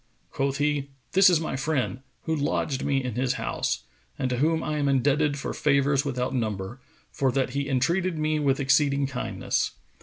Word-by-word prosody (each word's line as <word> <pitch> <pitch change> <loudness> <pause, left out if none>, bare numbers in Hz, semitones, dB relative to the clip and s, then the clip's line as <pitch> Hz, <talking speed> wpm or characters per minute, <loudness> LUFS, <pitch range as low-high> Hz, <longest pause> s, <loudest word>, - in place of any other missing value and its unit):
Quoth 140 0 -1
he, 145 -1 0 0.2
"This 190 +1 +7
is 175 -3 +4
my 160 - -3
friend, 135 -2 -1 0.2
who 160 - -1
lodged 145 -2 -1
me 135 -2 +1
in 125 -2 -3
his 125 +2 0
house - - -2 0.3
and 130 -1 -1
to 125 - 0
whom 160 +4 +1
I 150 -1 -2
am 140 -1 +1
indebted 145 +2 +2
for 135 - -4
favours 140 -1 +2
without 125 -3 -2
number, 110 -1 -3 0.3
for 135 -2 +1
that 135 -1 0
he 140 +1 -2
entreated 170 +7 +1
me 155 0 0
with 140 -2 +1
exceeding 140 +1 +3
kindness. 130 -2 -2
140 Hz, 180 wpm, -26 LUFS, 130-150 Hz, 0.3 s, This